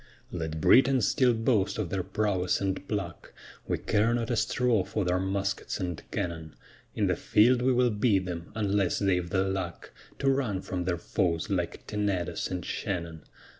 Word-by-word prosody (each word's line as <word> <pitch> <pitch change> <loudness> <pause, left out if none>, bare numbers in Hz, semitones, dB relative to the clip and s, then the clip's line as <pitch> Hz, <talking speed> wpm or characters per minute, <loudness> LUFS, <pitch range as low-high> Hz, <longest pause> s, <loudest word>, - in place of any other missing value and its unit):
Let 80 -2 -4
Britons 130 - +5
still 125 -4 +3
boast 110 -3 +1
of 100 -6 -3
their 95 -1 0
prowess 95 -1 0
and 95 -1 -2
pluck; 100 -5 -5 0.3
We - - 0
care 110 +3 +1
not 120 0 -2
a - - +2
straw 120 -3 +1
for 105 +1 -2
their 90 +1 +1
muskets 100 +2 -2
and 90 -4 -3
cannon. 80 -3 -4 0.4
In - - +1
the - - +1
field 120 +4 +3
we 130 +1 +3
will 125 -1 +3
beat 105 -3 +2
them, 85 -2 -6
unless 100 -3 +1
they've 90 -3 +1
the 95 +1 +1
luck 95 -2 -4 0.3
To 140 - -2
run 125 -9 +1
from 90 -2 -3
their 90 -1 0
foes 85 -1 -1
like - - -2
Tenedos 100 -5 -2
and 90 -2 -4
Shannon. 85 -5 -4
95 Hz, 170 wpm, -28 LUFS, 90-110 Hz, 0.4 s, Britons